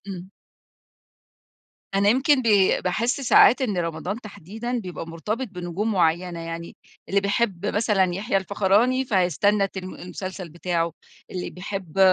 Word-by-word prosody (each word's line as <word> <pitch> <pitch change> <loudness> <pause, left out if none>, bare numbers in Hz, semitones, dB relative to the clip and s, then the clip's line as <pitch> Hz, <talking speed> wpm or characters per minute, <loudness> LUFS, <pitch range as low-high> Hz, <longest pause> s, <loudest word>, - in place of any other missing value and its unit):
إمم. 185 -1 -7 1.6
أنا 200 +1 +3
يمكن 265 +3 +4
بي 205 -4 +4
باحس 235 +9 0
ساعات 255 0 +6
إن 205 -8 0
رمضان 170 +6 -3
تحديدًا 220 +4 -5
بيبقى 180 -5 -6
مرتبط 215 +10 -4
بنجوم 180 +4 -3
معيّنة، 170 -1 +1
يعني 165 0 -7 0.3
اللي 200 0 +2
بيحب 200 -2 0
مثلًا 195 -4 +1
يحيى 195 0 -1
الفخراني 205 +7 +2
فهيستنى 195 - +2
تلم 185 -1 -7
المسلسل 185 0 -7
بتاعه، 170 0 -2 0.4
اللي 180 -1 -4
بيحب 190 -2 -6
195 Hz, 125 wpm, -24 LUFS, 175-215 Hz, 1.6 s, ساعات